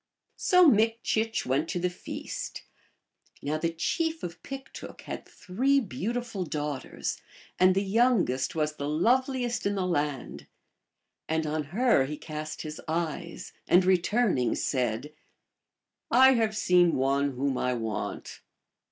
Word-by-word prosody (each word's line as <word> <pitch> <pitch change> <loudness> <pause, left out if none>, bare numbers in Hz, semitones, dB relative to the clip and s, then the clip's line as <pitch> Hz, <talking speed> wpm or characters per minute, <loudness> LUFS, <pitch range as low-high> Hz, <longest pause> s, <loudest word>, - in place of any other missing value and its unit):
* - - -49
So 360 -2 +7
Mikchich 225 -1 +2
went 140 +5 0
to 180 - -1
the 180 - +1
feast. - - -6 0.8
Now 150 +2 -1
the 165 +1 0
chief 320 - -1
of 175 0 -6
.Piktook 270 0 -9
had - - -7
three 265 +9 +1
beautiful 230 -1 -3
daughters, 150 -3 -4 0.4
and 185 0 +5
the 195 - +2
young 230 +2 +3
est 130 +3 -2
was 150 0 -1
the 145 +1 -3
loveliest 245 - +1
in 205 - -1
the 190 -2 -1
land. 145 -6 -2 0.8
And 160 0 0
on 155 0 -2
her 200 - +3
he 150 +2 -5
cast 155 0 -6
his 155 -1 -7
eyes, 170 +1 -3
and 180 +1 +5
returning 185 - +2
said, 125 +2 -1 0.5
" - - -61
I 265 +2 +7
have 220 -3 +1
seen 180 -3 +4
one 140 +1 +1
whom 135 +1 -1
I 125 0 0
want." 115 -3 -5
175 Hz, 140 wpm, -28 LUFS, 150-225 Hz, 0.8 s, So